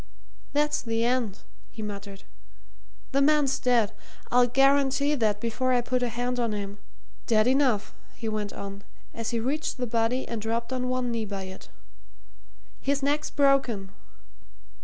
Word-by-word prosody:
"That's 295 +1 +1
the 230 -1 -1
end!" 240 -5 0 0.3
he 220 - -8
muttered. 200 -1 -7 0.9
"The 275 0 +2
man's 290 -1 +3
dead! 240 -4 +3 0.4
I'll 245 0 +5
guarantee 275 +2 +3
that 215 -7 +1
before 235 +3 0
I 245 - +3
put 250 +1 -1
a 245 - +1
hand 245 +2 -2
on 230 -3 0
him. 200 0 -5 0.5
Dead 215 -2 +4
enough!" 255 -5 +2 0.2
he 225 - -5
went 210 -2 -2
on, 200 0 -7 0.3
as 230 -1 -3
he 235 - 0
reached 280 +6 -1
the 250 - -1
body 230 +2 0
and 230 -2 -4
dropped 230 +3 -2
on 250 -1 -1
one 255 -1 0
knee 230 -2 -1
by 200 -2 -5
it. 190 - -10 1.1
"His 280 0 0
neck's 295 +2 +1
broken." 270 -9 +2
240 Hz, 155 wpm, -27 LUFS, 215-265 Hz, 1.1 s, I'll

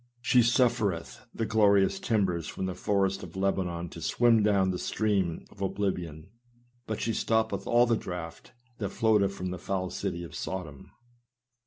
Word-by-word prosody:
She 125 +1 +3
sufTereth 115 -6 +1
the 115 - -2
glorious 105 - +3
timbers 95 - 0
from 95 - -4
the 95 - -2
forest 95 0 0
of 85 -1 -10
Lebanon 90 -3 -1
to 85 - -10
swim 115 +5 +3
down 100 -3 +3
the 90 - -3
stream 100 -6 -1
of 100 - -15
oblivion, 90 -4 -3 0.6
but 110 - -3
she 115 - -1
stoppeth 110 -2 0
all 120 +1 +5
the 115 -1 +2
draff 85 -4 -6 0.4
that 100 -3 -2
noateth 105 -3 +2
from 90 -2 -4
the 90 - -5
foul 95 0 -2
city 90 -3 -3
of 85 - -9
Sodom. 80 -7 -6
95 Hz, 160 wpm, -28 LUFS, 90-110 Hz, 0.6 s, all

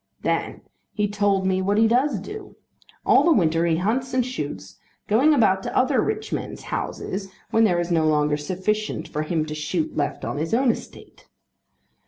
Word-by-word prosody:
Then - - -1 0.3
he 210 -1 0
told 200 -2 +1
me 190 0 +1
what 200 +2 +1
he 225 +1 +5
does 250 0 +2
do. 405 - -9 0.5
All - - +5
the 340 - +4
winter 165 - +3
he 165 - +2
hunts 250 +8 -1
and 250 -2 +2
shoots, 100 - -6 0.3
going 250 +9 +4
about 215 -9 +3
to - - -4
other 260 +1 +3
rich 430 0 -3
men's - - -5
houses 195 0 -4 0.2
when 225 0 +4
there 175 -5 +2
is 175 0 -2
no 160 -2 +3
longer 150 -1 +2
sufficient 190 +8 -2
for 150 - -3
him 155 0 -1
to 155 - -6
shoot 155 +2 -2
left 145 -1 -2
on - - -3
his 165 +8 -1
own 255 0 +4
estate. - - -11
195 Hz, 185 wpm, -23 LUFS, 160-235 Hz, 0.5 s, he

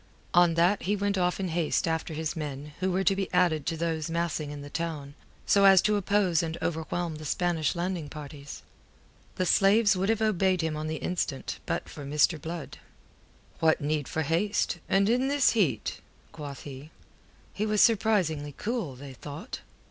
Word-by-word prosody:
On 175 -1 +5
that 175 +4 +3
he 205 +3 0
went 200 0 0
off 180 -1 0
in 190 -2 -2
haste 165 0 0
after 160 -1 -2
his 155 0 -3
men, 150 -1 -6
who 185 0 0
were 190 +2 +1
to 195 0 +3
be 195 0 -3
added 160 -5 +2
to 165 - -1
those 160 -1 -2
massing 165 -3 -2
in 145 -1 -7
the 145 - -9
town, 155 -4 -4 0.3
so 200 -1 +4
as 195 -1 +8
to 210 - +2
oppose 200 -4 +2
and 165 -1 -3
overwhelm 160 0 -2
the 155 - -9
Spanish 165 0 0
landing 175 -3 -3
parties. 145 -2 -9 0.7
The 185 - 0
slaves 200 +3 +4
would 190 +2 0
have 225 -1 +2
obeyed 190 -4 +2
him 160 -1 -1
on 155 +1 -4
the 160 - -2
instant 155 -4 -3
but - - -2
for 145 - -9
Mr. 150 +2 +2
Blood. 165 -1 -6 0.8
"What 160 -1 +3
need 150 -1 -1
for 160 - -2
haste, 175 +3 0
and 195 +1 +3
in 250 +4 +2
this 285 -1 +3
heat?" 155 - 0 0.3
quoth 145 -2 -8
he. 140 +1 -9 0.6
He 210 +2 -1
was 210 0 +1
surprisingly 185 -11 +2
cool, 215 - -3
they 135 +1 -10
thought. 145 - -8
170 Hz, 180 wpm, -28 LUFS, 150-195 Hz, 0.8 s, as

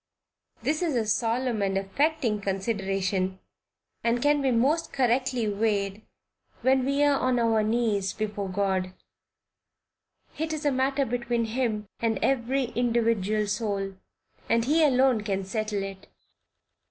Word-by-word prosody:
This 310 +2 0
is 330 -6 0
a 230 -2 +1
solemn 230 +1 0
and 195 -1 0
affecting 230 +3 0
consideration, 195 -2 -1 0.7
and 235 +1 +2
can 290 +2 +3
be 270 - +2
most 275 +8 +1
correctly 250 -2 +1
weighed 205 -1 0 0.6
when 260 +1 +4
we 280 +1 +2
are 285 -1 +3
on 255 -1 +1
our 225 -2 +3
knees 215 -3 +1
before 205 -2 -3
God; 185 -1 -1 1.5
it 320 0 -1
is 310 0 -4
a 290 - +3
matter 270 +1 +1
between 240 -1 -1
Him 220 -3 -2
and 225 -2 0
every 260 0 +1
individual 230 -3 +1
soul, 200 -2 -2 0.6
and 230 0 +3
he 315 +4 +3
alone 260 -5 +4
can 195 -2 -2
settle 215 0 -2
it. 195 0 -8
230 Hz, 130 wpm, -27 LUFS, 200-260 Hz, 1.5 s, when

